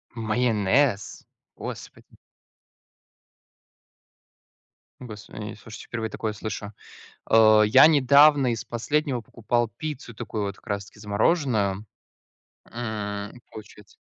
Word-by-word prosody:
Майонез? 110 0 0 0.3
Господи! - - -10 2.8
Господи, 105 -2 -9
э, - - -10
слушайте, 110 +1 -12
впервые 115 -2 -4
такое 110 -1 -4
слышу. 105 -1 -6 0.6
Э, 110 -1 +6
я 130 +8 +7
недавно 145 -2 +5
из 115 - -4
последнего 130 +2 -1
покупал 120 +1 -2
пиццу, 145 -6 -6
такую 105 0 -5
вот 100 0 -5
как - - -22
раз 100 -1 -3
таки 105 - -18
замороженную. 105 - 0 0.9
М, 105 -3 -5
и - - -14
получается 105 -1 -13
110 Hz, 100 wpm, -25 LUFS, 105-125 Hz, 2.8 s, я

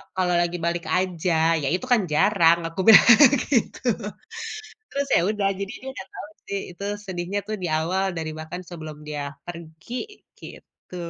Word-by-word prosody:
kalau 180 -1 +1
lagi 175 0 -1
balik 170 0 -1
aja," 165 -3 +1
"Iya 140 -3 -2
itu 220 - -4
kan 240 -4 +5
jarang!" 170 -1 +4
Aku 165 +3 -9
bilang 220 - +9 0.5
gitu. 240 -5 +1 1.1
Terus 280 0 -2
ya - - +4
udah, 210 -2 0
jadi 200 0 -4
dia 265 - -9
nggak 190 - -8
tahu - - -8 0.2
sih, 200 0 -2 0.2
itu 200 - -9 0.2
sedihnya 185 +1 -3
tuh 215 - -2
di 175 - 0
awal, 185 +5 0
dari 160 -1 -3
bahkan 160 +3 -6
sebelum 155 -3 -8
dia 145 -1 -4 0.2
pergi, 175 - -8
gitu. 180 - -13
180 Hz, 160 wpm, -24 LUFS, 165-200 Hz, 1.1 s, bilang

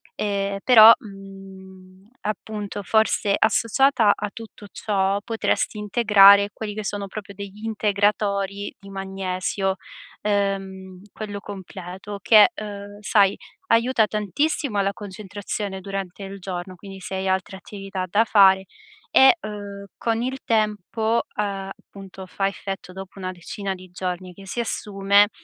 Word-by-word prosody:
ehm, 200 -1 -2
però, 225 -3 +10
mhmm, 195 -1 -13
appunto 210 -1 -5
forse 220 0 +2
associata 230 +1 +3
a 210 0 -4
tutto 220 -2 -11
ciò 195 -1 0
potresti 225 -1 -1
integrare 200 -2 +6
quelli 210 -2 -6
che 215 - -4
sono 200 0 -4
proprio 200 0 -8
degli 200 +1 -9
integratori 205 -2 0
di 200 - -13
magnesio, 195 0 -2 0.5
ehm, 195 -2 -2
quello 205 -2 -6
completo 190 0 -8
che, 215 - +7
ehm, 205 -5 -8
sai, 200 -1 +3 0.3
aiuta 230 -1 +3
tantissimo 210 - -1
la 200 0 0
concentrazione 205 0 -6
durante 195 -1 -6
il 195 +1 -7
giorno, 185 0 -6
quindi 195 +1 -11
se 190 - -6
hai 190 0 -2
altre 190 0 -1
attività 195 -1 -6
da 205 +5 +3
fare 190 -3 +5 0.5
e 265 +6 +7
ehm, 205 -3 -7
con 230 0 -1
il 260 +2 -2
tempo, 220 +1 0
ehm, 195 -2 -3
appunto 195 -1 -12
fa 195 +2 -2
effetto 195 -1 -6
dopo 190 +1 -10
una 185 -1 -4
decina 190 +2 -5
di 185 0 -12
giorni 180 0 -5
che 195 +2 -13
si 195 +5 -5
assume, 205 -2 +2
200 Hz, 130 wpm, -23 LUFS, 190-210 Hz, 0.5 s, però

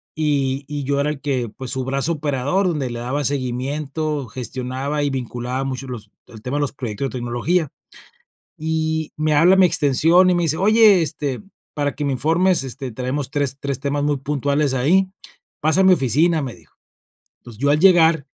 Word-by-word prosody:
Y 140 -3 0
y 145 -1 -4
yo 140 +1 0
era 145 +1 +1
el 150 -2 -5
que, 130 -5 -1
pues, 130 +3 -7
su 130 -1 -2
brazo 140 +5 0
operador, 145 +5 0
donde 145 -7 -1
le 120 0 -5
daba 135 +5 -2
seguimiento, 140 +2 -2
gestionaba 130 +4 -4
y 145 - +1
vinculaba 125 0 -3
mucho 135 0 -5
los 110 -5 -8 0.2
el 110 -2 -13
tema 130 +5 -3
de - - 0
los 145 - -2
proyectos 130 0 -4
de - - -12
tecnología. 130 +7 -1 0.9
Y 160 0 -2
me 155 0 0
habla 170 +5 +6
a - - +1
mi 185 - +7
extensión, 165 +3 +3
y - - +3
me 175 - +1
dice: 160 0 +1
"Oye, 210 -1 +5
este, 145 -4 -3 0.3
para 145 -2 -1
que 145 - -4
me 140 - 0
informes, 165 +4 +2
este, 130 -1 -6
traemos 130 +3 -3
3- 140 -2 -1
3 140 -2 -3
temas 145 0 -1
muy 145 -2 0
puntuales 140 0 0
ahí, 180 +9 +3 0.5
pasa 155 +5 +2
a - - +3
mi 185 -1 +7
oficina", 155 +4 +2
me 130 -3 -5
dijo. 85 -3 -22 0.7
Entonces, 115 -2 -13
yo 140 - +2
al 150 - +2
llegar, 165 -5 +5
140 Hz, 195 wpm, -20 LUFS, 130-155 Hz, 0.9 s, mi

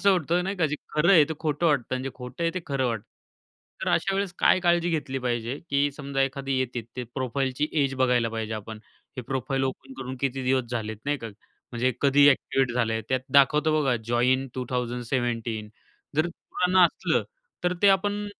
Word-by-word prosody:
असं 200 - +5
होतं 175 -1 +1
नाही 195 +1 -3
का 165 -3 +2
"जे 150 - -3 0.2
खरं 165 +5 +4
आहे 160 -6 +7
ते 160 - -3
खोटं 155 +1 0
वाटतं 140 -5 +1
आणि 130 0 -3
जे 135 - -3
खोटं 125 +5 -7
आहे 165 - +2
ते 185 - -2
खरं 135 -2 0
वाटतं." 115 -4 -2 0.8
तर - - -1
अशावेळेस 195 -1 0
काय 185 - +4
काळजी 175 -1 +2
घेतली 145 -5 -2
पाहिजे 120 +1 -2
की 140 +1 +2
समजा 140 -1 -4
एखादी 135 0 -1
येते 125 -2 -2
ते 125 - -3
प्रोफाईलची 130 +2 -1
एज 135 -1 0
बघायला 125 -3 +2
पाहिजे 110 -1 -3
आपण. 110 +1 -7 0.4
हे 125 - -4
प्रोफाईल 135 +2 -2
ओपन 135 0 -5
करून 130 0 -5
किती 135 -1 -1
दिवस 130 -1 +2
झाले, 110 -2 -3
नाही 145 +1 0
का? 115 - -6 0.5
म्हणजे 125 +2 +1
कधी 140 0 +6
ॲक्टिव्हेट 135 -2 +2
झालंय 115 -2 0
त्यात 130 0 +1
दाखवतो 150 +3 +5
बघा 135 -4 +2
जॉईन 125 +3 +2
2017 120 -3 -2 0.5
जर 155 - +3
पुराणं 180 +2 0
असलं - - -1 0.4
तर 180 - +2
ते 200 - +7
आपण 205 +2 +2
135 Hz, 185 wpm, -26 LUFS, 125-150 Hz, 0.8 s, आहे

